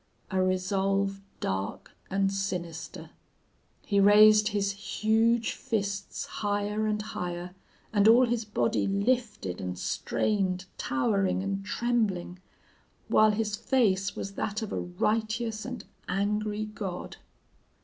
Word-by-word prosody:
A 190 0 +2
resolve 195 +1 0 0.2
dark 95 +1 -3 0.2
and 195 0 +1
sinister! 180 -4 -4 0.7
"He 200 - +2
raised 210 +1 +7
his 205 -2 0
huge 220 +3 +1
fists 200 -5 -3
higher 205 +1 -1
and 210 0 0
higher, 180 -3 -5 0.4
and 205 0 +4
all 240 +3 +7
his 235 -1 -1
body 215 +1 0
lifted 200 - -1
and 90 -1 -4
strained, 185 - -1
towering 190 - +1
and 195 0 -2
trembling, 205 -5 -1 0.7
while 215 0 +6
his 210 0 0
face 205 -6 +1
was 200 - -5
that 210 +2 -2
of 215 - -5
a - - -1
righteous 215 - -1
and 245 -5 -6 0.2
angry 210 +2 0
god. 200 -4 -6
205 Hz, 115 wpm, -28 LUFS, 190-215 Hz, 0.7 s, raised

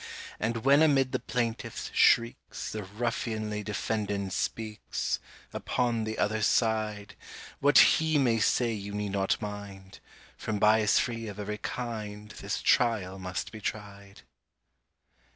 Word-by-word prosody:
And 115 +2 -2
when 140 +2 +6
amid 135 -4 +4
the - - 0
plaintiff's 115 -1 -3
shrieks, 115 0 +2
The 110 - -4
ruffianly 110 0 -3
defendant 100 -2 -2
speaks— 110 -2 -2 0.3
Upon 120 -3 -1
the 110 0 -4
other 110 +1 0
side; 110 -2 0 0.4
What 145 +1 +4
he 160 -1 +6
may 120 -5 +3
say 115 +1 +2
you 100 -1 -5
need 105 -1 -2
not 95 -1 0
mind— 100 -2 -8 0.4
From 110 - -3
bias 105 0 +4
free 115 -2 -1
of 100 -1 -7
every 105 +1 -4
kind, 105 -3 -5
This - - -4
trial 100 -6 +2
must 90 0 -4
be 110 - -9
tried! 100 -1 -6
110 Hz, 130 wpm, -29 LUFS, 105-115 Hz, 0.4 s, when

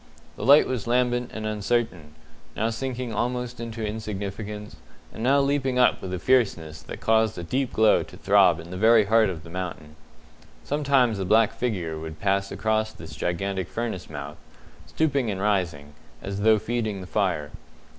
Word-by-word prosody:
The - - -7
light 140 +6 +7
was 125 -4 -3
lambent 125 0 +1
and 110 0 -6
uncertain, 105 -7 -2 0.4
now 110 +2 0
sinking 125 0 -4
almost 125 +2 -2
into 115 -1 -5
insignificance, 105 -2 -5 0.4
and - - -8
now 135 +4 +4
leaping 140 -2 0
up 125 - +4
with 95 - -6
a 90 - -2
fierceness 90 -9 +1
that - - -9
caused 110 -1 +2
a 85 - -5
deep 130 +9 -1
glow 110 -1 +4
to - - -10
throb - - +4
in 85 +2 -10
the 90 - -5
very 110 +1 +5
heart 110 0 +4
of 80 -4 -6
the 85 - -12
mountain. 85 -4 -6 0.7
Sometimes 135 -7 +2
a - - -1
black 110 +3 +4
figure 90 -10 -3
would 80 0 -8
pass 100 0 0
across 110 0 0
this 80 -5 -11
gigantic 95 +3 -2
furnace 115 -6 -4
mouth, 75 0 -7 0.5
stooping 140 -6 0
and 95 -2 -3
rising, 90 -8 -1 0.3
as 100 0 -5
though 110 +1 +5
feeding 110 -2 -2
the - - -7
fire. 90 -7 -1
110 Hz, 170 wpm, -25 LUFS, 90-120 Hz, 0.7 s, light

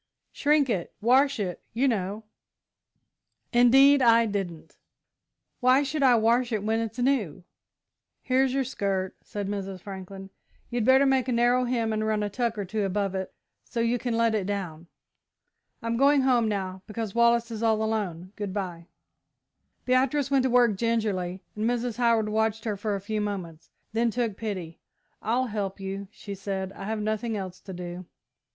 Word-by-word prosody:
"Shrink 295 -1 +2
it. 190 -8 -2
Wash 265 +4 +3
it, 180 -4 -3
you 255 +5 +2
know." 210 -2 -1 1.3
"Indeed 270 +4 +6
I 230 -1 +5
didn't. 195 -6 -4 0.8
Why 255 +2 +4
should 285 +2 -2
I 255 -3 +6
wash 235 +2 +2
it 215 -3 -1
when 220 +1 +1
it's 225 +1 -4
new?" 245 - 0 0.8
"Here's 260 0 +2
your 270 +1 +1
skirt," 195 -6 -2
said 205 -1 -5
Mrs. 195 -2 -4
Franklin. 195 0 -9 0.4
"You'd 240 -2 0
better 265 +2 +6
make 265 -1 +2
a - - 0
narrow 245 +1 +3
hem 230 -3 0
and 215 0 -1
run 215 -1 0
a 205 - -3
tuck 235 0 -1
or 205 - -2
two 210 +3 -2
above 195 0 -1
it 190 -1 -4 0.3
so 240 - -5
you 235 +1 +1
can 235 -2 -2
let 230 -1 +3
it 200 -3 -1
down. 175 -5 -4 1.0
I'm 230 0 -1
going 280 +2 +5
home 250 -4 +3
now, 190 -3 -3
because 215 -1 -4
Wallace 235 0 +3
is 220 -1 -5
all 220 -1 +2
alone. 195 -5 -3
Good 205 -2 -5
bye." 175 -4 -4 1.0
Beatrice 260 +2 +2
went 275 -1 +4
to - - +2
work 240 -4 +4
gingerly, 200 -5 -1
and 215 +2 0
Mrs. 240 -1 -2
Howard 230 -3 +3
watched 220 +1 0
her 215 -2 -1
for 205 +1 -2
a 195 - -4
few 215 +2 -2
moments, 180 -6 -5 0.2
then 230 +1 +2
took 230 -2 -1
pity. 185 -7 -5 0.4
"I'll 245 +4 +1
help 205 -4 -4
you," 195 +1 -5
she 200 -1 -9
said, 195 -1 -4
"I 195 - -8
have 220 +1 -2
nothing 215 +1 -1
else 185 -2 -6
to 190 - -9
do." 175 0 -7
220 Hz, 170 wpm, -27 LUFS, 195-240 Hz, 1.3 s, Indeed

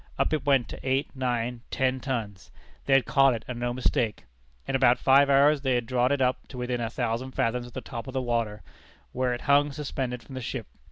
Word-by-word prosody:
Up - - +1
it 155 - 0
went 135 -4 +3
to - - -8
eight, 135 +3 -1
nine, 120 -2 -2
ten 130 0 0
tons! 115 -8 -4 0.4
They 135 - +3
had 135 -2 +5
caught 135 -3 +4
it, 115 - -8
and 125 -2 -5
no 120 0 -1
mistake. 120 -3 -1 0.4
In 135 - -1
about 125 -2 +4
five 140 +1 +5
hours 140 +1 +5
they 130 -2 +1
had 120 -1 0
drawn 125 +2 +1
it 140 -1 +1
up 125 0 -1
to 130 - -10
within 125 -1 -2
a 115 - -2
thousand 120 +2 -3
fathoms 120 +1 -1
of 120 - -14
the - - -5
top 120 -1 -7
of 130 - -7
the - - +1
water, 115 -3 -2 0.5
where 125 0 0
it 120 - -9
hung 145 +1 +3
suspended 135 -4 -4
from 135 - -13
the 130 - -5
ship. 120 -1 -4
125 Hz, 230 wpm, -27 LUFS, 120-135 Hz, 0.5 s, had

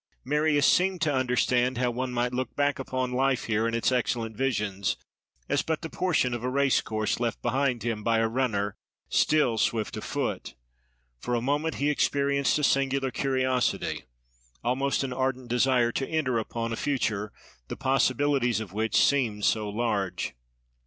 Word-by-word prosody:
Marius 150 +1 +2
seemed 185 +3 +3
to 155 -2 +2
understand 125 -1 +1
how 125 -1 +1
one 125 +1 -3
might 125 0 -1
look 125 -1 -3
back 145 -1 +1
upon 130 -1 -2
life 130 0 +1
here, 110 0 0
and 115 - -1
its 115 - +1
excellent 120 -3 -1
visions, 105 -6 -1 0.5
as - - +1
but 160 +1 -3
the 160 - -5
portion 160 -9 +1
of 120 -1 -4
a 125 - 0
race 140 0 +2
course 110 0 -2
left 115 -3 -1
behind 125 -2 0
him 115 -2 -2
by 115 0 +2
a 115 0 +2
runner 110 -5 -1 0.3
still 125 -8 +2
swift 110 -2 0
of - - -6
foot: - - -3 0.6
for 120 - -2
a - - +1
moment 145 +6 -1
he 145 +2 +1
experienced 140 -1 +1
a 150 - -2
singular 135 -1 +1
curiosity, 130 -1 0 0.6
almost 135 +4 0
an 130 -2 -3
ardent 130 -1 -2
desire 125 -1 +3
to 135 +2 -3
enter 135 -7 0
upon 115 +1 -3
a - - -1
future, 110 -6 -1 0.4
the - - -6
possibilities 135 -2 +2
of 105 -4 -7
which 110 +2 -1
seemed 115 -7 +2
so 110 -2 +1
large. 105 -4 -2
125 Hz, 165 wpm, -27 LUFS, 115-135 Hz, 0.6 s, seemed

